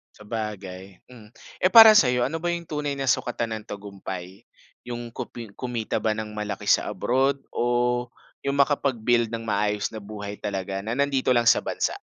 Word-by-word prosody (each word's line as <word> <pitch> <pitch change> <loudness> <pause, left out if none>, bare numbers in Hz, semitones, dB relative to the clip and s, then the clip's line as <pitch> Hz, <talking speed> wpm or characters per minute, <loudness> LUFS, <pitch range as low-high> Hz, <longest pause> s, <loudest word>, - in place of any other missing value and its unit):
Sabagay, 100 -4 -7
mm. 115 -4 -14 0.3
Eh, 185 - +4
para 225 -1 +11
sa'yo, 125 -7 +4
ano 160 +6 -2
ba 175 +1 -2
yung 170 -1 -5
tunay 150 -2 -2
na 135 -1 -3
sukatan 115 -2 0
ng 105 - -17
tagumpay? 100 0 -8 0.4
Yung 120 -1 -6
kumpli 115 -1 -7
kumita 120 0 -3
ba 110 -1 0
ng 110 0 -5
malaki 105 -1 -5
sa - - +4
abroad 135 +3 +1
o 120 0 0 0.4
yung 140 0 0
makapag-build 125 -5 +2
ng 115 +1 -5
maayos 105 -1 -1
na 110 - -6
buhay 100 0 -8
talaga 95 -1 -3
na 110 +4 -3
nandito 135 -2 +1
lang 120 - +3
sa - - +5
bansa? - - -2
115 Hz, 170 wpm, -25 LUFS, 105-130 Hz, 0.4 s, para